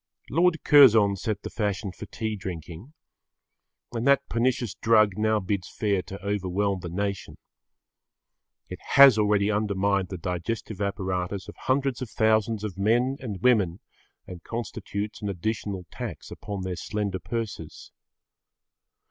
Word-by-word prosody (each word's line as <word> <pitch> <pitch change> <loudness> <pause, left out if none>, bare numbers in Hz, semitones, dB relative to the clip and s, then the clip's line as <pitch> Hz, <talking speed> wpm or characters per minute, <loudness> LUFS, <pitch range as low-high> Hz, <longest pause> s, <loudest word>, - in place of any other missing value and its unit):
Lord 170 +2 +2
Curzon 115 -9 +7
set 105 +1 -3
the - - -6
fashion 100 -2 -2
for 90 - -10
tea 110 -1 -3
drinking. 90 - -8 1.0
And 120 +2 -2
that 140 0 +4
pernicious 120 -2 0
drug 110 -3 +3
now 110 +1 +1
bids 95 -1 -3
fair 100 -3 0
to 95 +2 -9
overwhelm 100 0 -1
the 85 - -6
nation. 100 +2 -4 1.3
It - - -8 0.2
has 135 -5 +9
already 105 -1 +2
undermined 100 -2 0
the 95 - -5
digestive 90 +5 -4
apparatus 95 -1 -2
of - - -10
hundreds 130 -1 -1
of 125 - -4
thousands 110 0 +1
of 100 -3 -5
men 120 +6 +2
and 105 -8 -6
women 100 -8 +3 0.5
and 90 -2 -9
constitutes 110 -2 -5
an 105 - -2
additional 100 0 -3
tax - - -7
upon 100 -2 -6
their 90 -2 -4
slender 100 -3 -3
purses. 110 -8 -6
105 Hz, 135 wpm, -26 LUFS, 95-115 Hz, 1.3 s, has